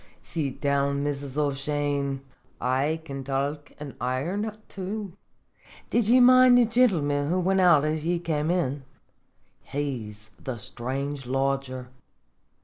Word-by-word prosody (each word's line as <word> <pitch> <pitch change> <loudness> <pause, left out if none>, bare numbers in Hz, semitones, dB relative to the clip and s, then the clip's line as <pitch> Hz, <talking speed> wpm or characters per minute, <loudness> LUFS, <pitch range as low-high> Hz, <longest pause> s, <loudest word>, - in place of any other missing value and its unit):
"Sit 145 -5 -3
down, 140 0 +1
Mrs. 140 -1 -3
O'Shane; 140 -1 -1 0.4
I 140 +6 0
can 135 -3 -6
talk 140 +2 -2
an' 145 -3 -7
iron 165 - -1 0.2
too. 195 0 -5 0.8
Did 235 -3 +2
ye 250 +3 +6
mind 255 0 +7
the 245 - +6
gintleman 165 - +2
who 180 +2 +1
wint 190 +1 +2
out 170 -5 +5
as 155 0 -1
ye 175 +2 +1
kem 160 -2 -1
in? 145 -6 0 0.8
He's 110 -7 -5
the 130 -4 -4
strange 135 +4 -4
lodger. 135 -1 -1
145 Hz, 125 wpm, -26 LUFS, 135-175 Hz, 0.8 s, mind